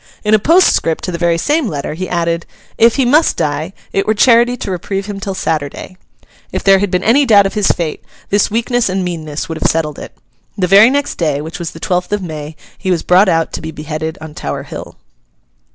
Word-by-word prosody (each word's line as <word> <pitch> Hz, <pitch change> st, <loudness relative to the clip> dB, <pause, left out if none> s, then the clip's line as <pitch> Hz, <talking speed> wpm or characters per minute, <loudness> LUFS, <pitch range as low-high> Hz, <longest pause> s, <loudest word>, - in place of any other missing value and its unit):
In 210 Hz, 0 st, +1 dB
a 215 Hz, -, +6 dB
postscript 310 Hz, -, +3 dB
to 180 Hz, -, -3 dB
the 170 Hz, -, -4 dB
very 170 Hz, -1 st, +2 dB
same 295 Hz, -, 0 dB
letter, 145 Hz, -5 st, -4 dB
he 185 Hz, +3 st, -5 dB
added, 170 Hz, -1 st, -1 dB, 0.3 s
'If 230 Hz, 0 st, +4 dB
he 270 Hz, -, +2 dB
must 300 Hz, +6 st, +3 dB
die, 150 Hz, +4 st, -2 dB, 0.2 s
it 195 Hz, -, 0 dB
were 215 Hz, -, +2 dB
charity 240 Hz, +2 st, +4 dB
to 200 Hz, -, -5 dB
reprieve 195 Hz, +2 st, -3 dB
him 205 Hz, -1 st, -6 dB
till 195 Hz, -1 st, -4 dB
Saturday.' 160 Hz, 0 st, -3 dB, 0.6 s
If -, -, -3 dB
there 195 Hz, -1 st, +5 dB
had 205 Hz, 0 st, 0 dB
been 180 Hz, 0 st, -1 dB
any 260 Hz, +6 st, +4 dB
doubt 210 Hz, -6 st, +5 dB
of 195 Hz, -, -2 dB
his 210 Hz, -2 st, +1 dB
fate, 165 Hz, -3 st, -1 dB, 0.3 s
this 205 Hz, 0 st, +2 dB
weakness 235 Hz, +1 st, 0 dB
and 185 Hz, 0 st, -1 dB
meanness 160 Hz, -1 st, -4 dB
would 160 Hz, -2 st, -5 dB
have -, -, +2 dB
settled 150 Hz, -2 st, -2 dB
it. -, -, -10 dB, 0.4 s
The 190 Hz, -, +1 dB
very 200 Hz, +5 st, +7 dB
next 285 Hz, +2 st, -2 dB
day, 150 Hz, -4 st, 0 dB
which 160 Hz, +5 st, -7 dB
was 170 Hz, -1 st, -4 dB
the 165 Hz, -, -12 dB
twelfth 180 Hz, +2 st, -2 dB
of 205 Hz, -2 st, -1 dB
May, 155 Hz, -2 st, -7 dB, 0.2 s
he 190 Hz, -, -3 dB
was 175 Hz, -3 st, +1 dB
brought 185 Hz, +3 st, +4 dB
out 165 Hz, -1 st, 0 dB
to -, -, -4 dB
be 160 Hz, -, -6 dB
beheaded 155 Hz, +1 st, -5 dB
on 160 Hz, -1 st, -9 dB
Tower 70 Hz, -, -5 dB
Hill. -, -, -9 dB
185 Hz, 225 wpm, -15 LUFS, 160-210 Hz, 0.6 s, very